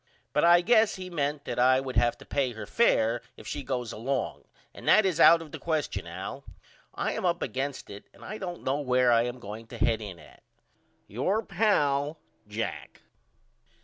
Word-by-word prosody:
But 150 - +2
I 175 +1 +7
guess 220 +2 +4
he 185 -1 -8
ment 145 -2 -2
that - - -3
I 130 +1 +5
would 130 -1 -5
have 120 0 +2
to - - -14
pay 135 -4 -1
her 110 -2 -7
fair 120 - +2 0.2
if - - -13
she 145 - -4
goes 125 -4 -3
along 130 +4 -3 0.3
and - - -11
that 215 - +6
is 185 -5 0
out 165 0 +7
of 155 - -14
the - - -7
question 150 - -2
Al. 95 +11 -7 0.5
I - - -1
am - - -4
up 175 -1 +1
against 135 +3 -4
it 100 0 -10
and - - -15
I 215 +1 -6
don't 175 -3 -6
know 135 +2 0
where 125 -2 +3
I 115 0 +4
am 120 +1 -4
going 110 -1 -9
to 120 - -9
head 110 0 +1
in 100 -4 -7
at. 75 - -17 0.6
Your 190 - -1
pal, 155 -8 +1 0.3
JACK. 110 +2 -5
135 Hz, 195 wpm, -28 LUFS, 115-170 Hz, 0.6 s, I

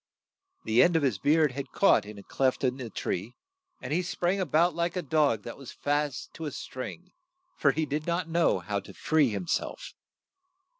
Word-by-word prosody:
The 110 +2 +4
end 175 -1 +4
of 160 - +3
his 125 -8 +1
beard 155 -1 +3
had 135 +1 -6
caught 195 - +4
in 105 0 -9
a 100 - -10
cleft 130 0 0
in 130 0 +1
the 125 -4 -6
tree, 105 +3 -4 0.4
and - - -4
he 175 - +2
sprang 180 +1 -1
a 185 - -1
bout 165 +5 +3
like 170 +1 -1
a 180 - -2
dog 145 -8 +2
that 120 - -7
was 135 - -9
fast 145 -1 -2
to 160 - -6
a 150 - -3
string, 170 +9 -7 0.4
for 140 - +3
he 160 +3 -1
did 150 +2 -3
not 170 0 0
know 165 - +2
how 100 +3 -2
to - - -13
free 150 -3 +2
him 110 - -3
self. - - -3
150 Hz, 205 wpm, -28 LUFS, 130-170 Hz, 0.4 s, The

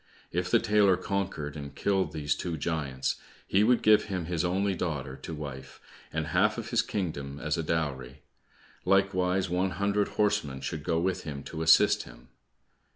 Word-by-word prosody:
If 90 +1 -1
the - - +5
tailor 105 -3 +4
conquered 95 -7 -3
and 70 -2 -7
killed 95 -2 +1
these 75 -2 0
two 85 0 -4
giants, 70 -5 -2 0.3
he 100 - +3
would 120 +2 +3
give 105 -1 +6
him 95 -5 -3
his 85 0 -1
only 95 +3 +1
daughter 75 -7 -3
to 80 - -7
wife, 65 -3 -8 0.3
and 80 0 -2
half 75 - +2
of - - -5
his - - +4
kingdom 70 -8 -4
as 75 +2 -1
a 85 - -1
dowry, 70 -5 -3 0.6
likewise 95 -1 +2
one 90 +2 0
hundred 100 +3 0
horsemen 100 -11 +1
should 75 -2 -4
go 80 0 +1
with 95 +1 0
him 70 -3 -6
to 80 - -6
assist 80 0 +5
him. - - -14
85 Hz, 170 wpm, -29 LUFS, 75-95 Hz, 0.6 s, give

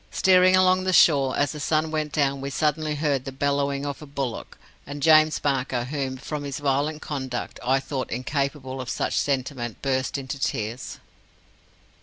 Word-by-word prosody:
Steering 185 0 +5
along 185 0 +4
the 185 0 0
shore, 140 -6 +5
as 145 - +1
the 150 - -7
sun 155 +2 0
went 155 -1 -2
down, 140 -2 0
we 140 - -3
suddenly 150 +1 0
heard 145 -3 0
the 135 - -6
bellowing 140 +1 -1
of 140 0 -5
a 150 - -9
bullock, 135 -4 -5 0.3
and 145 0 -6
James 155 0 +6
Barker, 130 -3 -1
whom, 135 0 -3
from 150 +2 -5
his 140 -2 -4
violent 145 +2 -1
conduct, 130 -4 -4
I 130 +2 +2
thought 135 -1 -4
incapable 135 +1 -3
of 125 - -7
such - - -1
sentiment, 130 -4 -2
burst 130 0 0
into 135 0 -5
tears. 115 -1 -3
140 Hz, 170 wpm, -25 LUFS, 130-150 Hz, 0.3 s, James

